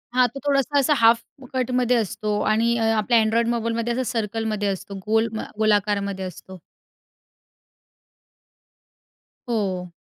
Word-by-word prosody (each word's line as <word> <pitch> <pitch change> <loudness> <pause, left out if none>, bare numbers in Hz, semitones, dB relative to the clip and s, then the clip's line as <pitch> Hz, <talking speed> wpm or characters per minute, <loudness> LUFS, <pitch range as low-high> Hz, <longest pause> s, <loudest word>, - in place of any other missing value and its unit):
हां. 250 -1 +5
तो 275 - -9
थोडासा 280 0 +2
अ, 280 +2 +3
हाल्फकटमध्ये 250 +1 +1
असतो 210 -1 -2
आणि 230 +2 +2
अ, 225 - 0
आपल्या 225 +2 +3
Android 230 +2 +1
मोबाईलमध्ये 230 0 -1
असं 260 - -1
सर्कलमध्ये 215 -2 -2
असतो, 195 +1 -4
गोल 225 +1 +2
म 220 - -3 0.2
गोलाकारामध्ये 205 -2 +1
असतो. 185 +1 -10 2.9
हो. 190 -6 -2
225 Hz, 115 wpm, -23 LUFS, 205-240 Hz, 2.9 s, हां